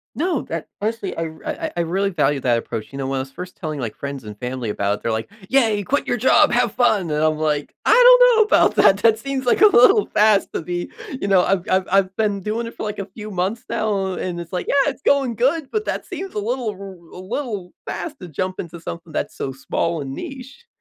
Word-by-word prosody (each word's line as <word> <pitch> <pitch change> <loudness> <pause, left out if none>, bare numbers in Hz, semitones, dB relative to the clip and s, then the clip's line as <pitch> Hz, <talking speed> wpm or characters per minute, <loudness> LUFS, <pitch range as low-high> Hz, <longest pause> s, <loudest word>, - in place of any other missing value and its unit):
No, 330 -3 0
that 165 -1 -5
honestly, 215 -2 -2
I 165 - -2
r 160 0 -9
I - - -1 0.2
I - - -8
I - - 0
really 190 +4 0
value 145 -6 +1
that 120 -2 +2
approach, 115 0 -5
you 135 - -8
know, 135 - -3
when 135 0 -2
I - - 0
was 135 +1 -5
first 180 +3 -8
telling 155 -5 -5
like 120 -4 -4
friends 140 -3 -6
and 105 -1 -9
family 125 -2 -4
about 100 0 0
it, - - -13
they're 115 - 0
like, 110 +7 -3 0.2
"Yeah, 225 -6 +3
quit 285 +10 -1
your 245 - 0
job, 275 +5 +4
have 240 -3 +2
fun", 205 -9 +2
and 150 +1 0
I'm 155 -1 +2
like, 150 -2 -1
"I - - +4
don't - - +7
know - - +5
about - - +3
that." 195 - +6
That 225 -1 +4
seems 275 -2 -3
like 250 - +2
a 425 - +10
little 395 - +5
fast 210 -1 +3
to - - -2
be, 175 0 -4 0.3
you 200 - -1
know, 190 -2 +4
I've 190 -2 +1
I've 185 0 +2
I've 195 -1 +2
been 205 -2 0
doing 220 +4 -2
it 230 - -8
for - - -9
like 210 -1 -4
a 195 - -3
few 210 +2 -9
months 190 +4 -2
now, 195 -3 -1
and 175 -2 -4
it's 170 -1 -8
like, 180 - -2
"Yeah, 280 -1 +3
it's - - -8
going 270 -5 +2
good", 275 +5 +1
but 430 0 -1
that - - -3
seems 385 0 -6
a 210 - -2
little, 235 +2 -2
a - - -10
little 190 -3 -12
r - - -9
a - - -7
little 205 -4 -5
fast 300 -4 -5
to 180 - -8
jump 185 +4 -4
into 170 0 -6
something 170 -1 -8
that's - - -3
so 135 - -3
small 145 +4 -2
and 135 -1 -5
niche. 275 - -9
195 Hz, 260 wpm, -21 LUFS, 160-240 Hz, 0.3 s, a